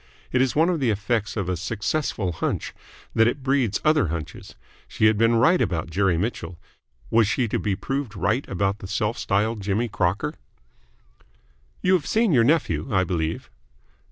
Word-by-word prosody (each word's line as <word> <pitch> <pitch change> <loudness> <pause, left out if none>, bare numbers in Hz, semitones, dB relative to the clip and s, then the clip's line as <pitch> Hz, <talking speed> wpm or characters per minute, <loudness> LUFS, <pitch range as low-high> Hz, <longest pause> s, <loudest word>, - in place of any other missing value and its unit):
It 130 - +2
is 130 -1 +1
one 160 +3 +4
of 175 -3 0
the 130 -4 +1
effects 105 +1 -1
of 100 -4 -2
a 90 - 0
successful 105 - -2
hunch 80 - -3 0.4
that 115 0 +4
it 130 +3 -2
breeds 130 -6 +1
other 155 - +4
hunches. 80 -1 -6 0.3
She - - 0
had 110 0 +5
been 115 +2 +3
right 160 +11 +4
about 85 -1 -1
Jerry 95 -1 +2
Mitchell; 95 -2 -3 0.5
was 115 -2 +4
she 120 +2 0
to - - -1
be 100 -3 -1
proved 135 +1 -4
right 110 +7 0
about 100 +2 -1
the 95 - -8
self 105 +3 -1
styled 105 +2 0
Jimmy 100 +4 0
Crocker? 95 -5 -1 1.5
"You 185 - +3
have 175 -6 +1
seen 225 -2 +2
your 125 -6 +5
nephew, 150 +3 +1
I 95 -2 +3
believe?" 85 -3 -3
110 Hz, 175 wpm, -24 LUFS, 95-130 Hz, 1.5 s, had